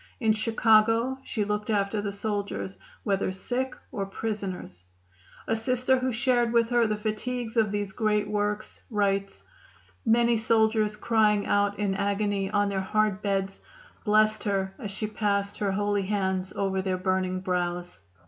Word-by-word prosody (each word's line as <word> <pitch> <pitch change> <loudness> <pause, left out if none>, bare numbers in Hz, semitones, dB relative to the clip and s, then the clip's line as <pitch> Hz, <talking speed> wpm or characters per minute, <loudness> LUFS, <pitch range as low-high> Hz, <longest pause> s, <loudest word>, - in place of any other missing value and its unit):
In 220 -4 +3
Chicago 225 +3 +3
she 210 -3 -2
looked 210 +1 -2
after 205 0 +1
the 200 -1 -3
soldiers, 200 -1 -3 0.2
whether 195 -3 0
sick 250 +7 -3 0.2
or 195 -1 -3
prisoners. 195 - -5 0.6
A 225 - +2
Sister 255 +3 +1
who 255 0 0
shared 240 -1 +2
with 235 0 +2
her 240 -2 +4
the 215 0 -1
fatigues 225 +2 -3
of 220 -3 +3
these 205 -1 -2
great 210 0 +1
works 210 0 -2
writes: 200 -3 0 0.6
"Many 235 0 +4
soldiers 220 -1 +2
crying 210 -2 +2
out 205 0 +1
in 205 -2 0
agony 200 0 0
on 205 0 +2
their 195 -1 -1
hard 210 0 +1
beds 195 -1 -1 0.4
blessed 215 0 +3
her 195 -2 0
as 215 -6 -5
she 200 +2 -4
passed 200 -2 -1
her 200 -2 0
holy 205 0 +1
hands 190 -2 -1
over 190 -1 -1
their 185 -1 -1
burning 185 0 0
brows. 180 - -2
210 Hz, 150 wpm, -27 LUFS, 195-220 Hz, 0.6 s, her